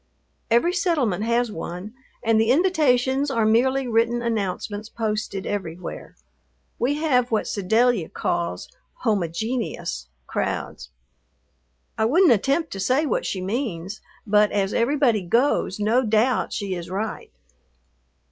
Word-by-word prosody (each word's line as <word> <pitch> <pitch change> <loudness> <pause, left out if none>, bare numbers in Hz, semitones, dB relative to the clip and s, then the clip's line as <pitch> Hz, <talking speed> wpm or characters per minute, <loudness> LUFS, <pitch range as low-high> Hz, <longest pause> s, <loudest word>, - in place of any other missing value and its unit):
Every 240 +10 +3
settlement 295 - +1
has 235 0 +1
one 180 +3 -6 0.3
and 225 -1 +3
the 225 - +1
invitations 280 -4 +2
are 230 -5 +1
merely 260 +4 +2
written 235 +1 +1
announcements 210 -1 -3
posted 215 -3 -3
everywhere. 180 -3 -5 0.6
We 265 +5 +1
have 260 -6 +1
what 220 -2 0
Sedalia 220 -1 +1
calls 85 +1 -2 0.4
"homogenous" 205 - -2 0.2
crowds. 65 +1 -3 1.1
I 220 - +3
wouldn't 330 +8 +5
attempt 275 - +1
to 195 - -5
say 255 +10 +2
what - - -1
she 190 - -3
means, 195 -3 -3 0.2
but 210 0 +4
as 195 -1 0
everybody 240 -3 +2
goes 220 +1 +1
no 225 +5 +2
doubt 225 +3 +2
she 200 -3 -3
is 175 -2 -6
right. 210 +4 -4
225 Hz, 120 wpm, -23 LUFS, 200-255 Hz, 1.1 s, wouldn't